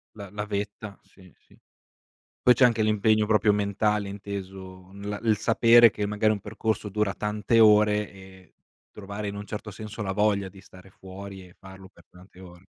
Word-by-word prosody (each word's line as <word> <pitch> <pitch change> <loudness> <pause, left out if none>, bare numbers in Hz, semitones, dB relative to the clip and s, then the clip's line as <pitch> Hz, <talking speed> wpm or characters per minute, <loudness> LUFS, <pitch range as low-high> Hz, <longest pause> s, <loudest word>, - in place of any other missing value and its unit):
La 100 -3 -9
la 105 0 -5
vetta, 105 0 -6
sì, 90 -3 -20
sì. - - -25 0.8
Poi 125 - +6
c'è 125 - +2
anche 115 -3 +3
l'impegno 110 0 +2
proprio 105 0 +3
mentale, 105 0 0
inteso 95 -2 -8
n 100 - -12
la 105 0 -4
il 110 -2 +3
sapere 115 +1 +5
che 105 0 -3
magari 105 +1 +1
un 105 - -2
percorso 110 +1 -3
dura 105 0 -1
tante 105 +3 0
ore 105 -1 +4
e 95 -1 -16 0.4
trovare, 100 +1 -7
in 100 - -5
un 100 - -7
certo 105 0 -7
senso, 105 +2 -8
la 95 -2 -3
voglia 100 -1 +1
di 95 0 -14
stare 95 +1 -17
fuori 95 0 -11
e 90 - -21
farlo 95 0 -13
per - - -22
tante 90 0 -18
ore. 90 0 -14
105 Hz, 185 wpm, -25 LUFS, 95-105 Hz, 0.8 s, Poi